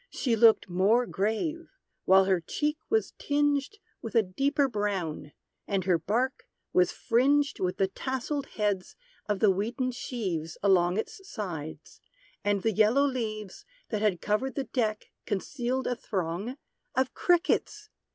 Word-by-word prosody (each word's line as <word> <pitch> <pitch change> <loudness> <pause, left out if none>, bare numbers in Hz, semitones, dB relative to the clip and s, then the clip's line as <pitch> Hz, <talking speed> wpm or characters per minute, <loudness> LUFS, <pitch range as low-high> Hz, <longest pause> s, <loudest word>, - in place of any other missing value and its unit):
She 240 -4 0
looked 225 -1 +5
more 200 +7 +3
grave; 235 - -2 0.4
while 190 0 +6
her 190 -2 +2
cheek 300 - -2
was 440 0 +1
tinged 290 +5 +1 0.2
With 225 - -7
a 225 - +6
deeper 275 +9 +1
brown; 195 - -3 0.4
and 195 -2 0
her 175 -2 +2
bark 235 +10 -1 0.3
was 180 -1 +4
fringed 280 +5 +2
With 180 -1 -1
the 195 - +2
tasselled 265 +6 -3
heads 205 -3 -1 0.3
of 205 -2 -1
the 210 -3 +6
wheaten 235 +7 -1
sheaves 185 -10 -4
Along 180 -2 +4
its 390 - -4
sides; 165 - -6 0.4
and 205 -1 +1
the 225 - +2
yellow 220 +7 +4
leaves, 215 -7 -4 0.3
That 215 -2 -2
had 205 -6 +1
covered 240 +5 0
the 275 - -1
deck 220 -5 -1 0.2
concealed 250 +5 -2
a 245 - 0
throng 195 - -3 0.4
Of 260 0 +1
_Crickets! 370 +4 +1
220 Hz, 140 wpm, -28 LUFS, 190-265 Hz, 0.4 s, while